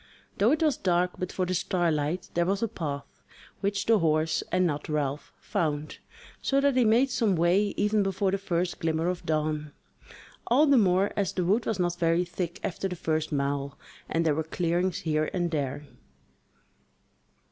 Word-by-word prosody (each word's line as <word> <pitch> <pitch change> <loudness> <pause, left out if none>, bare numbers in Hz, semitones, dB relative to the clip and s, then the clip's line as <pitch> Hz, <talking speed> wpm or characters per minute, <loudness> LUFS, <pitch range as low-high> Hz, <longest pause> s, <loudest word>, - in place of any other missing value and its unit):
Though 215 +5 +4
it 315 +2 +2
was 305 -3 +2
dark 180 -1 +1
but 185 - -3
for 185 - -1
the 185 - -2
starlight, 170 -2 -1
there 170 0 +1
was 195 +3 0
a - - +2
path, 150 -9 -6 0.4
which 200 0 -1
the 225 -2 +4
horse, 155 0 +1
and 185 0 +3
not 150 -3 -2
Ralph, 145 -1 -2
found, 150 -2 -2 0.4
so 275 - +2
that 280 -1 +2
he 255 - +4
made 240 +5 +4
some 225 -6 +2
way 180 +5 +2
even 210 +1 +2
before 195 0 0
the 195 - -1
first 175 -2 -2
glimmer 160 0 0
of 180 -1 -4
dawn, 155 -1 -1 0.7
all 265 +6 +5
the 280 -2 +4
more 190 0 +3
as 200 -4 -1
the 180 - -1
wood 210 +6 +1
was 220 - 0
not 175 -1 0
very 170 +1 +2
thick 175 0 -4
after 195 0 -2
the 180 - -5
first 155 -1 -1
mile, 140 -1 -2 0.3
and 165 +1 0
there 155 - +3
were 160 +2 -1
clearings 175 +3 -1
here 155 -3 0
and 175 -2 0
there. 145 -1 -2
175 Hz, 180 wpm, -27 LUFS, 155-200 Hz, 0.7 s, all